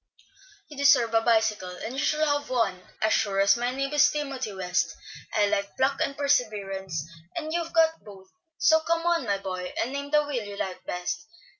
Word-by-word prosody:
"You 295 Hz, -, -12 dB
deserve 275 Hz, -5 st, +4 dB
a 225 Hz, -, +4 dB
bicycle, 220 Hz, -4 st, +2 dB
and 225 Hz, -, -6 dB
you 275 Hz, -, -2 dB
shall 305 Hz, +1 st, +2 dB
have 290 Hz, -1 st, 0 dB
one, 230 Hz, -8 st, 0 dB, 0.2 s
as 220 Hz, -, +3 dB
sure 195 Hz, -2 st, +1 dB
as 200 Hz, 0 st, +5 dB
my 240 Hz, +1 st, -1 dB
name 275 Hz, +2 st, -3 dB
is 295 Hz, 0 st, +6 dB
Timothy 275 Hz, -6 st, -3 dB
West. 185 Hz, -2 st, -1 dB, 0.4 s
I 210 Hz, -, +3 dB
like 200 Hz, -1 st, -2 dB
pluck 270 Hz, +1 st, +1 dB
and 275 Hz, -, -1 dB
perseverance, 200 Hz, -, -1 dB, 0.3 s
and 315 Hz, -2 st, -4 dB
you've 335 Hz, -1 st, -2 dB
got 325 Hz, -1 st, +3 dB
both; 195 Hz, -2 st, -14 dB, 0.3 s
so 320 Hz, +1 st, +5 dB
come 330 Hz, +1 st, -1 dB
on, 340 Hz, -5 st, +2 dB
my 200 Hz, -2 st, +1 dB
boy, 185 Hz, -2 st, -5 dB
and 250 Hz, +4 st, -1 dB
name 280 Hz, 0 st, -4 dB
the 300 Hz, 0 st, +3 dB
wheel 265 Hz, -6 st, -3 dB
you 200 Hz, 0 st, -8 dB
like 190 Hz, -2 st, -4 dB
best. 180 Hz, +13 st, -4 dB
245 Hz, 195 wpm, -26 LUFS, 200-295 Hz, 0.4 s, is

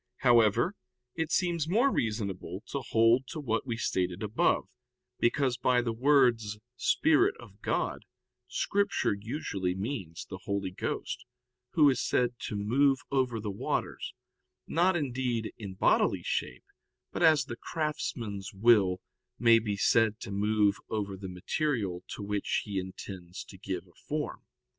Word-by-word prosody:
However, 120 Hz, -, +4 dB, 0.4 s
it 160 Hz, -2 st, -2 dB
seems 170 Hz, -4 st, +1 dB
more 240 Hz, +9 st, +4 dB
reasonable 100 Hz, -4 st, -2 dB
to 140 Hz, -, -2 dB
hold 115 Hz, +3 st, +4 dB
to 160 Hz, -, -6 dB
what 120 Hz, -3 st, -1 dB
we 115 Hz, -2 st, -2 dB
stated 90 Hz, -3 st, -1 dB
above; 105 Hz, +2 st, +1 dB, 0.5 s
because 125 Hz, 0 st, +2 dB
by 125 Hz, -1 st, +3 dB
the 115 Hz, -1 st, -1 dB
words 120 Hz, -4 st, +3 dB, 0.2 s
"Spirit 345 Hz, -, +3 dB
of -, -, -14 dB
God" -, -, -1 dB, 0.4 s
Scripture 200 Hz, -, +1 dB
usually 100 Hz, -4 st, -3 dB
means 95 Hz, -, -4 dB
the 95 Hz, -, -7 dB
Holy 100 Hz, -2 st, -2 dB
Ghost, 125 Hz, -, -4 dB, 0.5 s
Who 150 Hz, -3 st, +6 dB
is 130 Hz, -3 st, +3 dB
said 125 Hz, -1 st, +1 dB
to -, -, -4 dB
"move 135 Hz, +7 st, +3 dB
over 130 Hz, -4 st, +1 dB
the 105 Hz, -1 st, -3 dB
waters," 95 Hz, -, -3 dB, 0.5 s
not, 175 Hz, +3 st, +2 dB
indeed, 125 Hz, -6 st, -1 dB
in 100 Hz, -4 st, -7 dB
bodily -, -, +2 dB
shape, 60 Hz, -, -3 dB, 0.5 s
but -, -, -4 dB
as 160 Hz, -3 st, +5 dB
the 120 Hz, -, -6 dB
craftsman's 115 Hz, -10 st, -4 dB
will 95 Hz, -4 st, +4 dB, 0.4 s
may 115 Hz, -1 st, +6 dB
be 105 Hz, -3 st, -2 dB
said 110 Hz, +1 st, +3 dB
to -, -, -6 dB
move 105 Hz, 0 st, +2 dB
over 100 Hz, -3 st, -2 dB
the 95 Hz, 0 st, -7 dB
material 95 Hz, -, -2 dB
to 105 Hz, -, -7 dB
which 100 Hz, 0 st, -1 dB
he 100 Hz, -2 st, -2 dB
intends 95 Hz, -1 st, -7 dB
to -, -, -13 dB
give 95 Hz, -2 st, -5 dB
a 90 Hz, -, -23 dB
form. 150 Hz, 0 st, -3 dB
115 Hz, 145 wpm, -30 LUFS, 100-135 Hz, 0.5 s, Who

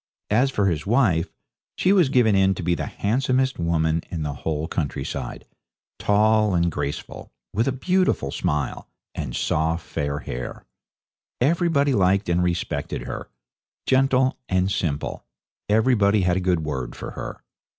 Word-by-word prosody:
As 125 Hz, +6 st, +4 dB
for 105 Hz, -6 st, 0 dB
his 85 Hz, -3 st, 0 dB
wife, 105 Hz, -9 st, +2 dB, 0.5 s
she 190 Hz, -, +3 dB
was 180 Hz, -8 st, +4 dB
given 120 Hz, -6 st, +4 dB
in 95 Hz, 0 st, +3 dB
to 90 Hz, -, -5 dB
be 85 Hz, +1 st, +2 dB
the -, -, -3 dB
handsomest 130 Hz, +3 st, 0 dB
woman 80 Hz, -1 st, +1 dB
in 80 Hz, -3 st, -3 dB
the 75 Hz, -1 st, -2 dB
whole 75 Hz, +2 st, -3 dB
countryside 70 Hz, -5 st, -4 dB, 0.5 s
tall 105 Hz, -1 st, +3 dB
and 85 Hz, 0 st, +2 dB
graceful, 70 Hz, -1 st, -5 dB, 0.2 s
with 115 Hz, +6 st, +1 dB
a -, -, +2 dB
beautiful 180 Hz, -, +1 dB
smile, 75 Hz, -1 st, -2 dB, 0.3 s
and 65 Hz, -5 st, -4 dB
soft 80 Hz, +2 st, 0 dB
fair 70 Hz, 0 st, -2 dB
hair. 60 Hz, -4 st, -6 dB, 0.7 s
Everybody 145 Hz, 0 st, +2 dB
liked 95 Hz, -2 st, +2 dB
and 85 Hz, 0 st, +2 dB
respected 85 Hz, -1 st, -2 dB
her, -, -, -6 dB, 0.6 s
gentle 130 Hz, 0 st, +3 dB
and 95 Hz, +1 st, +1 dB
simple 75 Hz, -6 st, -2 dB, 0.5 s
everybody 105 Hz, -2 st, +3 dB
had 90 Hz, -1 st, +2 dB
a -, -, 0 dB
good 90 Hz, -2 st, +1 dB
word 70 Hz, -5 st, -4 dB
for -, -, -7 dB
her. -, -, -7 dB
95 Hz, 145 wpm, -23 LUFS, 80-125 Hz, 0.7 s, As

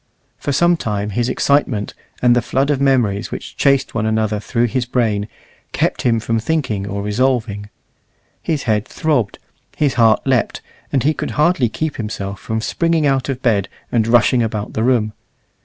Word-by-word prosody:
For 145 Hz, -, -2 dB
some 170 Hz, +5 st, +3 dB
time 105 Hz, -5 st, -2 dB
his 120 Hz, +4 st, 0 dB
excitement, 130 Hz, -6 st, +1 dB, 0.3 s
and 120 Hz, -1 st, +5 dB
the 120 Hz, -, +3 dB
flood 135 Hz, +4 st, 0 dB
of 140 Hz, -2 st, 0 dB
memories 120 Hz, -7 st, +2 dB
which -, -, -7 dB
chased 140 Hz, -1 st, +2 dB
one 110 Hz, -1 st, -1 dB
another 110 Hz, -1 st, 0 dB
through 115 Hz, +3 st, 0 dB
his 125 Hz, +1 st, -1 dB
brain, 110 Hz, -5 st, 0 dB, 0.5 s
kept -, -, 0 dB
him 115 Hz, -2 st, +2 dB
from 115 Hz, 0 st, -1 dB
thinking 110 Hz, -7 st, -1 dB
or 100 Hz, 0 st, -3 dB
resolving. 105 Hz, -2 st, 0 dB, 0.7 s
His 155 Hz, -4 st, -2 dB
head 110 Hz, 0 st, 0 dB
throbbed, 140 Hz, -11 st, 0 dB, 0.4 s
his 145 Hz, -3 st, +2 dB
heart 110 Hz, -1 st, +4 dB
leapt, 130 Hz, -5 st, +1 dB, 0.3 s
and 135 Hz, -, +1 dB
he 155 Hz, +3 st, +3 dB
could -, -, -4 dB
hardly 150 Hz, -6 st, +3 dB
keep 155 Hz, +6 st, -3 dB
himself 100 Hz, -3 st, -5 dB
from 110 Hz, 0 st, -3 dB
springing 165 Hz, +5 st, +1 dB
out 135 Hz, -1 st, +1 dB
of 130 Hz, -1 st, -3 dB
bed 105 Hz, -5 st, +1 dB, 0.2 s
and 115 Hz, -2 st, +2 dB
rushing 120 Hz, +1 st, +4 dB
about 105 Hz, -2 st, -3 dB
the 110 Hz, -, -1 dB
room. 115 Hz, -3 st, +2 dB
120 Hz, 175 wpm, -18 LUFS, 105-135 Hz, 0.7 s, and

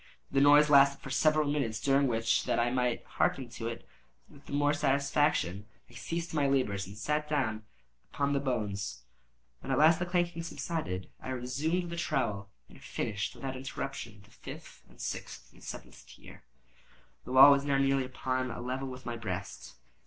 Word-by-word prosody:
The 135 Hz, -, +3 dB
noise 145 Hz, +1 st, +7 dB
lasted 140 Hz, -1 st, +6 dB
for 135 Hz, -, -7 dB
several 155 Hz, +2 st, +3 dB
minutes, 135 Hz, -7 st, -1 dB
during 140 Hz, +1 st, +3 dB
which, 115 Hz, -1 st, +1 dB
that -, -, 0 dB
I 120 Hz, +1 st, +2 dB
might 125 Hz, -1 st, 0 dB
hearken 130 Hz, -3 st, -1 dB
to 115 Hz, -1 st, -6 dB
it 115 Hz, 0 st, -6 dB, 0.4 s
with 140 Hz, -, -18 dB
the -, -, -10 dB
more 145 Hz, +1 st, +2 dB
satisfaction, 140 Hz, -, +1 dB, 0.2 s
I -, -, -18 dB
ceased 170 Hz, 0 st, -4 dB
my 145 Hz, -3 st, +2 dB
labors 105 Hz, -9 st, 0 dB
and 100 Hz, +2 st, -11 dB
sat 150 Hz, +7 st, -1 dB
down 110 Hz, -8 st, -1 dB, 0.5 s
upon 140 Hz, 0 st, 0 dB
the 140 Hz, -, +2 dB
bones. 105 Hz, -7 st, -3 dB, 0.6 s
When 135 Hz, -, -6 dB
at 130 Hz, -, +2 dB
last 160 Hz, +3 st, +6 dB
the 175 Hz, -, -2 dB
clanking 175 Hz, -2 st, 0 dB
subsided, 160 Hz, -, -4 dB
I -, -, -7 dB
resumed 145 Hz, +8 st, -2 dB
the 170 Hz, -, -5 dB
trowel, 115 Hz, -12 st, -1 dB, 0.2 s
and -, -, -17 dB
finished 105 Hz, 0 st, -3 dB
without 135 Hz, -1 st, -5 dB
interruption 130 Hz, -5 st, -6 dB
the 105 Hz, -, -21 dB
fifth, -, -, -11 dB
the -, -, -20 dB
sixth, -, -, -6 dB
and -, -, -19 dB
the -, -, -13 dB
seventh -, -, -9 dB
tier. -, -, -14 dB, 0.8 s
The 125 Hz, -, -8 dB
wall 135 Hz, +2 st, +10 dB
was 140 Hz, 0 st, +3 dB
now 140 Hz, -1 st, +1 dB
nearly 135 Hz, -1 st, +2 dB
upon 130 Hz, 0 st, -2 dB
a 115 Hz, -, -6 dB
level 130 Hz, +2 st, -3 dB
with 130 Hz, 0 st, -9 dB
my 120 Hz, -1 st, -4 dB
breast. 100 Hz, -4 st, -6 dB
135 Hz, 180 wpm, -31 LUFS, 115-145 Hz, 0.8 s, wall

